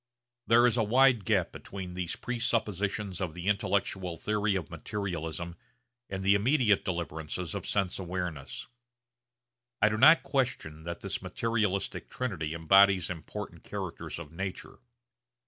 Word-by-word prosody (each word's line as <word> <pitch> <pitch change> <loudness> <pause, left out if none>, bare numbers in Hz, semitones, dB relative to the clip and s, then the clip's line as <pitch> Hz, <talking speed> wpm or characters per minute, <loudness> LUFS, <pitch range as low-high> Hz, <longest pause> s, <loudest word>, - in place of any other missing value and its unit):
There 120 +1 +6
is 125 0 +3
a 115 - +3
wide 120 -1 +4
gap - - +2
between 95 -2 -7
these 90 -2 -3
presuppositions 105 -5 -1
of 85 -4 -3
the 90 +2 -6
intellectual 95 -3 0
theory 105 +2 0
of 90 -6 -3
materialism 85 -4 -4 0.5
and 95 0 -4
the 100 +1 +5
immediate 110 -1 +3
deliverances 85 -1 -3
of - - -4
sense 95 -2 0
awareness. 90 -6 -4 1.1
I 100 - +5
do 110 0 -1
not 160 +6 +8
question 125 - -2
that 85 0 -5
this 100 0 -3
materialistic 100 0 -1
trinity 85 -11 -3
embodies 95 +2 +5
important 80 -3 -7
characters - - -5
of 85 -2 -8
nature. 95 +3 -6
95 Hz, 130 wpm, -30 LUFS, 85-110 Hz, 1.1 s, not